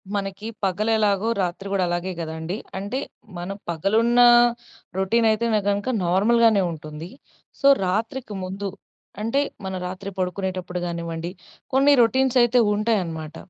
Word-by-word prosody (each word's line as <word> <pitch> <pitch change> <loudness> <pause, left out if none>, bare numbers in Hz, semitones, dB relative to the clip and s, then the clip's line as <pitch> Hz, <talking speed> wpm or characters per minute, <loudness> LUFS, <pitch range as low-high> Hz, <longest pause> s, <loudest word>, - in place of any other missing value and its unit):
మనకి 195 +1 -4 0.2
పగలు 200 +4 0
ఎలాగో 210 0 +1
రాత్రి 180 +2 -3
గూడా 195 -2 +1
అలాగే 175 +2 -2
గ‌దండీ. 160 +3 -4 0.2
అంటే 205 +7 -3 0.4
మనం 180 +3 -5
పగలున్నా 225 +8 +4 0.7
రొటీన్ 225 +4 +2
అయితేనే 220 0 +1
గనక 200 +4 -1 0.2
నార్మల్‌గానే 210 +3 +4
ఉంటుంది. 155 +1 -8 0.5
సో 275 - +4 0.2
రాత్రికి 220 +4 -2
ముందు 195 +2 -4 0.5
అంటే 230 +6 +1 0.2
మనం 190 -1 -3
రాత్రి 190 +2 -6
పడుకునేటప్పుడు 185 0 -3
గా‌నివ్వండి 170 0 -4 0.4
కొన్ని 275 +2 +5
రొ‌టీన్స్ 260 +2 +2
అయితే 240 +1 +3
ఉంటాయనమాట. 180 -8 -1
195 Hz, 120 wpm, -23 LUFS, 180-225 Hz, 0.7 s, కొన్ని